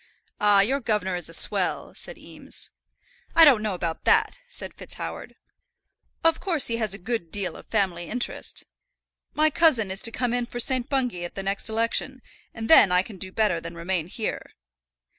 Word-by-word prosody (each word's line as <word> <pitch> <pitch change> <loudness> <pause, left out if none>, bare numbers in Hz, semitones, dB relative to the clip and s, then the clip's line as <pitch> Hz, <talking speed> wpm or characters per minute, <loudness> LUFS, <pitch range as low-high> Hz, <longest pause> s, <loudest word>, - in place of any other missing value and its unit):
"Ah, 205 -1 +6
your 265 +8 +1
governor 210 -7 -1
is 175 - -4
a - - -12
swell," - - +1
said - - -6
Eames. - - -9 0.6
"I 330 - +9
don't 260 -8 +6
know 210 -3 -2
about 170 -2 -4
that," 445 +2 +3
said - - -5
FitzHoward. - - -8 0.9
"Of 330 0 +3
course 335 -7 +1
he 230 - 0
has 215 -4 0
a - - -8
good 195 -4 -4
deal 200 -3 -2
of - - -13
family 185 -5 0
interest. 240 +7 -2 0.7
My 310 +1 +3
cousin 275 - +3
is 190 - -2
to 230 - 0
come 245 0 -1
in 245 -1 -1
for 240 - -6
St. 255 0 +2
Bungay 250 -10 -1
at 175 - -7
the 195 - -4
next 195 +3 -1
election, 230 +3 -1 0.3
and 225 -1 -6
then 210 - +7
I 180 0 +4
can 200 -1 -11
do 185 0 -7
better 205 -5 +1
than 170 +1 -8
remain 170 -1 -2
here." 215 +4 -4
220 Hz, 185 wpm, -25 LUFS, 190-255 Hz, 0.9 s, I